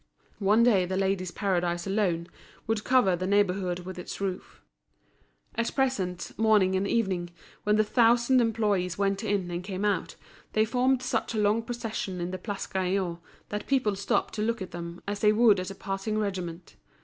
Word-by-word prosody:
One 210 +3 +4
day 200 -7 +4
The 190 +1 -2
Ladies' 190 -1 0
Paradise 175 -3 -1
alone 190 -4 0 0.4
would 220 -1 -1
cover 250 -8 +4
the 185 +1 -3
neighbourhood 190 -3 +1
with 185 0 -8
its 180 - -7
roof. 190 -2 -4 0.9
At 230 0 -2
present, 195 -11 -1
morning 210 -4 +4
and 190 +1 0
evening, 190 -7 0 0.4
when 210 0 +3
the 215 - +4
thousand 235 +3 +4
employees 210 -6 0
went 195 -1 0
in 195 -3 -1
and 175 +1 -3
came 190 +1 -3
out, 205 - 0 0.4
they 215 0 +3
formed 255 +2 +1
such 230 -2 -1
a - - 0
long 210 +2 +3
procession 225 -5 -4
in 175 +1 -3
the 185 - -5
Place 200 +1 -4
Gaillon 185 -2 -1 0.3
that 210 0 -4
people 255 -7 +2
stopped 195 - 0
to 215 - -3
look 230 +1 0
at 190 - -6
them 170 0 -7
as 205 0 -2
they 210 0 +5
would 215 -2 +5
at 185 +1 -4
a 195 - -7
passing 195 +2 -3
regiment. 185 -5 -4
200 Hz, 180 wpm, -28 LUFS, 185-220 Hz, 0.9 s, they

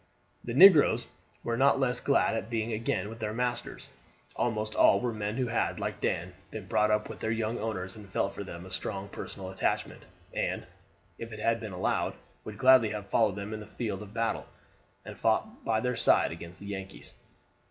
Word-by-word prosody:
The 120 - -4
negroes 145 - +8 0.4
were 115 - -1
not 135 +1 +4
less 125 -2 +1
glad 140 -4 +2
at 110 -1 -3
being 115 -1 -1
again 105 -3 -1
with 115 +1 -9
their 110 -1 -3
masters. 120 0 -3 0.4
Almost 110 -2 -1
all - - +5
were 120 -2 -1
men 105 0 -3
who 130 - +1
had, 115 -1 -1
like - - -4
Dan, 85 +2 -1 0.2
been 110 -3 -7
brought 105 +3 +2
up 105 0 +1
with - - -8
their 110 - -2
young 115 0 -1
owners, 95 -4 -3
and 105 -2 -12
felt 100 +1 -1
for - - -6
them 85 -2 -8
a 95 - -11
strong 95 +1 -4
personal 95 -1 -7
attachment, 95 - -1 0.3
and, - - -2 0.5
if 115 0 -7
it 110 - -7
had 115 +1 +1
been 110 -2 -6
allowed, 90 0 -1 0.3
would 105 -1 -8
gladly 130 -2 +6
have 105 -2 -6
followed 110 -4 +3
them 100 +1 -5
in 110 - -4
the 105 - -9
field 105 -5 -4
of 105 -1 -9
battle, 115 +1 -1 0.6
and - - -9
fought - - 0
by 110 -1 +1
their 125 +2 -1
side - - +3
against 85 +2 -9
the 100 - -10
"Yankees." 95 -1 -7
110 Hz, 200 wpm, -29 LUFS, 100-115 Hz, 0.6 s, negroes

